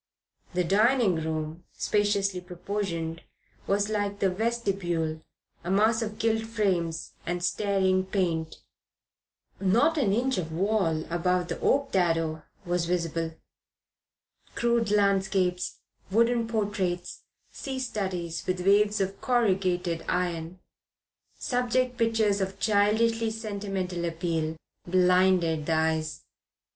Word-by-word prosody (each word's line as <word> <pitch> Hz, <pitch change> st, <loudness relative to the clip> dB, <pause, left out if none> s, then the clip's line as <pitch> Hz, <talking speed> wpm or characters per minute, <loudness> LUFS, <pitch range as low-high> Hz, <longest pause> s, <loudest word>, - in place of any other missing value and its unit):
The 180 Hz, -, +2 dB
dining 215 Hz, +1 st, +3 dB
room, 160 Hz, +1 st, -3 dB
spaciously 200 Hz, -3 st, +1 dB
proportioned, 180 Hz, -2 st, -4 dB, 0.5 s
was, 200 Hz, +1 st, +2 dB
like 205 Hz, -1 st, -1 dB
the 195 Hz, -2 st, +1 dB
vestibule, 185 Hz, -7 st, -1 dB, 0.4 s
a 175 Hz, -, -5 dB
mass 220 Hz, +4 st, +3 dB
of 215 Hz, -1 st, -4 dB
gilt 225 Hz, 0 st, +1 dB
frames 180 Hz, -8 st, -1 dB
and 175 Hz, 0 st, -3 dB
staring 190 Hz, -1 st, +1 dB
paint. 170 Hz, -5 st, -1 dB, 1.0 s
Not 240 Hz, +12 st, +3 dB
an 215 Hz, -8 st, +2 dB
inch 250 Hz, +2 st, +1 dB
of 160 Hz, -2 st, -4 dB
wall 170 Hz, -3 st, +1 dB
above 180 Hz, +1 st, +1 dB
the -, -, -3 dB
oak 280 Hz, 0 st, +2 dB
dado 165 Hz, -4 st, +1 dB, 0.2 s
was 175 Hz, -1 st, 0 dB
visible. 165 Hz, -2 st, -1 dB, 1.2 s
Crude 235 Hz, -2 st, +1 dB
landscapes, 195 Hz, -3 st, +1 dB, 0.3 s
wooden 230 Hz, +3 st, +2 dB
portraits, 200 Hz, -5 st, -2 dB, 0.3 s
sea 270 Hz, -1 st, -5 dB
studies 185 Hz, -9 st, -3 dB
with 180 Hz, 0 st, -1 dB
waves 205 Hz, +1 st, +4 dB
of 195 Hz, +1 st, -3 dB
corrugated 185 Hz, -8 st, +1 dB
iron, 175 Hz, -1 st, -2 dB, 0.8 s
subject 250 Hz, 0 st, 0 dB
pictures 220 Hz, -3 st, +2 dB
of 190 Hz, +1 st, -3 dB
childishly 220 Hz, +2 st, +2 dB
sentimental 200 Hz, -5 st, -3 dB
appeal, 165 Hz, -1 st, -2 dB, 0.3 s
blinded 180 Hz, -3 st, +3 dB
the 165 Hz, -, +2 dB
eyes. 160 Hz, -1 st, 0 dB
190 Hz, 110 wpm, -27 LUFS, 170-215 Hz, 1.2 s, waves